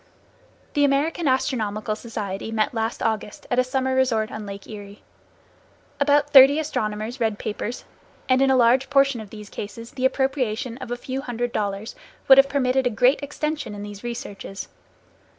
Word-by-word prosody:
The 290 - +2
American 290 +4 +1
Astronomical 215 -6 0
Society 215 -2 -5
met 220 +1 0
last 225 0 -2
August 220 -2 -2
at 245 - +3
a - - +5
summer 260 0 -1
resort 235 -4 +1
on 215 -1 -6
Lake 200 0 -8
Erie. 205 -1 -10 1.0
About 290 0 +3
thirty 275 +1 +9
astronomers 220 -5 -3
read 220 -3 0
papers, 215 +3 -5 0.4
and 255 0 +3
in 270 - +4
a 265 - +4
large 255 +2 +4
portion 275 -4 +3
of 210 - -11
the 210 0 -10
cases 230 +3 -8
the 260 -1 -2
appropriation 260 -2 -1
of - - -7
a 245 - -3
few 260 +2 -4
hundred 245 -2 -3
dollars 205 +1 -3 0.3
would 265 0 +9
have 275 0 +5
permitted 265 -2 +1
a - - +2
great 250 +6 +3
extension 295 -5 -4
in 205 - -7
these 205 0 -9
researches. 205 -5 -6
245 Hz, 170 wpm, -23 LUFS, 215-270 Hz, 1.0 s, thirty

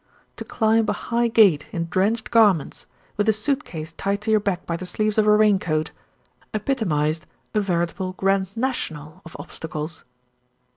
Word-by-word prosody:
To - - -5
climb 220 -1 +1
a - - +2
high 235 0 0
gate 200 -10 +4
in 165 -1 -2
drenched 205 +6 0
garments, 210 -10 +3 0.3
with 205 +1 +2
a - - +5
suit 260 +6 -1
case 160 -1 -8
tied 200 +4 -2
to 220 - -1
your 215 - +5
back 200 -4 -2
by 170 - -2
the 180 +2 -6
sleeves 215 +2 0
of 215 - +3
a 210 - +6
rain 210 -2 +4
coat, 155 -2 -1 0.6
epitomised 165 - -1 0.3
a 210 - +2
veritable 185 0 -2
Grand 195 0 +1
National 160 - -3
of 165 - -11
obstacles. 155 0 -6
195 Hz, 165 wpm, -23 LUFS, 165-220 Hz, 0.6 s, a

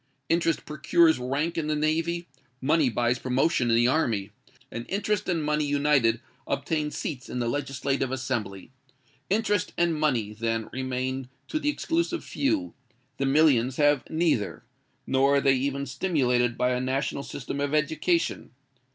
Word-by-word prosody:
Interest 165 -1 +1
procures 160 +1 +3
rank 145 +7 -1
in 155 - -2
the 155 - 0
Navy—money 155 -3 0
buys 120 +1 0
promotion 130 +1 +1
in 115 - +4
the 120 +1 +4
Army—and 115 -3 -3
interest 205 0 -1
and 165 -3 0
money 150 0 +1
united 140 -5 +2 0.3
obtain 150 +2 -1
seats 140 -3 -5
in - - -4
the 120 -1 -1
Legislative 135 0 -1
Assembly. 120 -6 -3 0.6
Interest 205 -1 +1
and 170 -1 +2
money, 130 -9 0
then, 115 0 -2
remain 130 0 -3 0.2
to 310 - -2
the 295 - 0
exclusive 335 +3 -1
few: 280 -1 -1 0.4
the 135 - 0
millions 135 -4 +4
have 145 -2 +4
neither—nor 140 - 0
are - - +5
they 135 -1 +4
even 140 +1 -1
stimulated 125 -5 +1
by 125 - +2
a 125 0 0
national 135 +2 -1
system 140 0 -6
of 145 +1 0
Education. 160 +3 0
140 Hz, 140 wpm, -26 LUFS, 125-160 Hz, 0.6 s, are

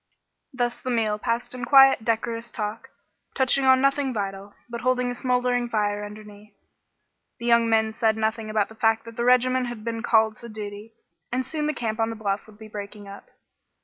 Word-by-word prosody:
Thus 245 -2 -2
the 255 - -4
meal 220 -3 0
passed 230 +2 -2
in 250 -1 -6
quiet, 270 -2 +6
decorous 230 +1 -2
talk, 210 0 -5 0.5
touching 265 0 +2
on 260 0 +6
nothing 275 0 +2
vital, 195 0 -5
but 235 0 -6
holding 250 0 +1
a - - -3
smoldering 245 -1 0
fire 205 -2 0
underneath. 210 0 -11 0.8
The 235 - -8
young 235 -1 +4
men 220 -1 +2
said 220 0 +1
nothing 220 0 -1
about 215 -1 0
the - - -12
fact 225 0 +1
that 230 0 -10
the 235 - -2
regiment 250 +1 +3
had 240 -3 -7
been 230 0 -3
called 220 -2 +3
to 235 - -9
duty, 210 +1 -8 0.4
and 255 +1 -1
soon 300 +3 -2
the 305 - 0
camp 220 -1 -3
on 225 0 +1
the 225 - -5
bluff 205 -1 -3
would 215 -1 -16
be 220 0 -11
breaking 205 -1 -8
up. 200 0 -11
230 Hz, 195 wpm, -25 LUFS, 215-245 Hz, 0.8 s, quiet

